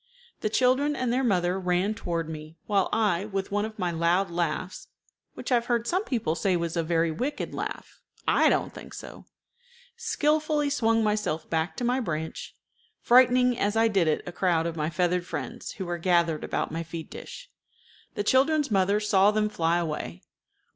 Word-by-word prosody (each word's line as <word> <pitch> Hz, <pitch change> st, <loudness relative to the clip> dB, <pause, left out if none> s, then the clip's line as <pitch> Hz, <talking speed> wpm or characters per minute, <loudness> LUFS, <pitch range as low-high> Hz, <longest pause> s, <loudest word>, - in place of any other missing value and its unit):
The 215 Hz, -, -1 dB
children 260 Hz, +6 st, +2 dB
and 250 Hz, -3 st, -1 dB
their 260 Hz, +2 st, +1 dB
mother 185 Hz, -5 st, +1 dB
ran 180 Hz, +3 st, +1 dB
toward 170 Hz, -6 st, -3 dB
me, 155 Hz, 0 st, -8 dB
while 200 Hz, -3 st, +1 dB
I, 205 Hz, -4 st, +1 dB
with 195 Hz, -2 st, -4 dB
one 205 Hz, +1 st, 0 dB
of 220 Hz, 0 st, -8 dB
my 180 Hz, -3 st, -1 dB
loud 170 Hz, +3 st, +1 dB
laughs 175 Hz, +2 st, -3 dB, 0.5 s
(which -, -, -6 dB
I -, -, +6 dB
have 235 Hz, 0 st, 0 dB
heard 235 Hz, -1 st, +1 dB
some 370 Hz, -, 0 dB
people 225 Hz, -, -1 dB
say 185 Hz, +2 st, +1 dB
was 170 Hz, -1 st, -2 dB
a 170 Hz, -, +1 dB
very 165 Hz, 0 st, +1 dB
wicked 255 Hz, -, -3 dB
laugh: -, -, -6 dB, 0.3 s
I -, -, +5 dB
don't -, -, 0 dB
think -, -, -10 dB
so), -, -, -10 dB, 0.7 s
skillfully 305 Hz, -9 st, +1 dB
swung 225 Hz, -4 st, +2 dB
myself 210 Hz, -7 st, -1 dB
back 160 Hz, +2 st, -1 dB
to -, -, -3 dB
my 250 Hz, +2 st, +1 dB
branch, 160 Hz, -8 st, -4 dB, 0.4 s
frightening 250 Hz, 0 st, +5 dB
as 205 Hz, +1 st, +1 dB
I 225 Hz, 0 st, +4 dB
did 195 Hz, -6 st, +2 dB
it 155 Hz, -, +1 dB
a 180 Hz, -, -5 dB
crowd 175 Hz, -2 st, +1 dB
of 170 Hz, -1 st, -3 dB
my 155 Hz, -1 st, -1 dB
feathered 175 Hz, +2 st, 0 dB
friends 240 Hz, +1 st, -5 dB
who 190 Hz, -, -5 dB
were 175 Hz, 0 st, -3 dB
gathered 170 Hz, -3 st, +2 dB
about -, -, -2 dB
my 165 Hz, +1 st, -3 dB
feed 165 Hz, -1 st, -7 dB
dish. -, -, -10 dB, 0.6 s
The 205 Hz, -, -1 dB
children's 280 Hz, +4 st, +3 dB
mother 200 Hz, +1 st, +3 dB
saw 200 Hz, -1 st, +4 dB
them 210 Hz, 0 st, +1 dB
fly 170 Hz, -4 st, +1 dB
away. 150 Hz, -, -4 dB
195 Hz, 185 wpm, -27 LUFS, 170-235 Hz, 0.7 s, I